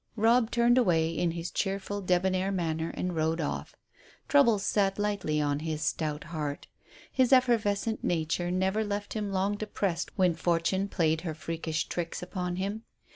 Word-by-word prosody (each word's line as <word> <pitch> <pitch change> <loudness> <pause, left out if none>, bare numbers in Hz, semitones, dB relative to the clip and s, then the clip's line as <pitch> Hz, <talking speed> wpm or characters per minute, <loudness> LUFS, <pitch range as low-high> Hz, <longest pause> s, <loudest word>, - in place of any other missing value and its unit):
Robb 230 +1 +4
turned 240 +1 +4
away 165 -8 +2
in 170 +1 0
his 170 +1 -4
cheerful, 200 +1 -2
debonair 185 +1 +1
manner 165 -3 -1
and 180 -1 -2
rode 160 +1 0
off. 150 - -3 0.5
Troubles 235 -8 +4
sat 195 -2 +1
lightly 200 -7 0
on 145 -1 0
his 155 0 -3
stout 150 0 -1
heart. 150 -4 -4 0.5
His 260 -1 +2
effervescent 225 -4 +2
nature 175 +1 0
never 190 +4 +1
left 205 -1 -3
him 210 -2 -3
long 195 +2 0
depressed 200 -4 -2
when 185 -3 +4
Fortune 170 +4 0
played 160 -5 +1
her 160 -4 -4
freakish 160 -1 -3
tricks 175 0 -4
upon 180 -1 -3
him. 200 +4 -3
185 Hz, 155 wpm, -29 LUFS, 165-205 Hz, 0.5 s, Robb